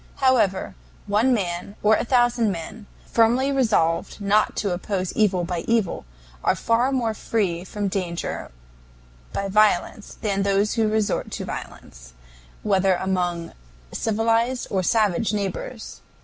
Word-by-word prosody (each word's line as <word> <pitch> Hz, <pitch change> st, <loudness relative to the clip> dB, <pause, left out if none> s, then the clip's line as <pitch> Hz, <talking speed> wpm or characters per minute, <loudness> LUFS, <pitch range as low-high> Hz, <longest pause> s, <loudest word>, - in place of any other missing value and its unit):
However, 250 Hz, -8 st, +2 dB, 0.3 s
one 210 Hz, +5 st, +2 dB
man, 185 Hz, -3 st, -2 dB
or 215 Hz, +1 st, +5 dB
a -, -, -1 dB
thousand 240 Hz, -3 st, +2 dB
men, 195 Hz, +5 st, -7 dB, 0.2 s
firmly 240 Hz, +4 st, +2 dB
resolved 215 Hz, -13 st, +1 dB
not 205 Hz, +1 st, +2 dB
to 200 Hz, -, -1 dB
oppose 185 Hz, 0 st, -3 dB
evil 190 Hz, -5 st, +2 dB
by 175 Hz, 0 st, -2 dB
evil 225 Hz, -, 0 dB, 0.4 s
are -, -, +3 dB
far 235 Hz, +3 st, +1 dB
more 240 Hz, -4 st, 0 dB
free 190 Hz, -6 st, -1 dB
from 205 Hz, +2 st, -3 dB
danger 180 Hz, -3 st, -3 dB, 0.8 s
by 200 Hz, -, -2 dB
violence 210 Hz, 0 st, +1 dB
than 200 Hz, -2 st, -1 dB
those 200 Hz, +1 st, +1 dB
who 225 Hz, -2 st, +1 dB
resort 215 Hz, -1 st, 0 dB
to -, -, -4 dB
violence, -, -, -9 dB, 0.5 s
whether 195 Hz, -2 st, +3 dB
among 180 Hz, -2 st, -2 dB, 0.4 s
civilized 230 Hz, +3 st, +1 dB
or 190 Hz, -, +1 dB
savage 210 Hz, +1 st, +1 dB
neighbors. 210 Hz, +3 st, -4 dB
205 Hz, 130 wpm, -23 LUFS, 185-225 Hz, 0.8 s, or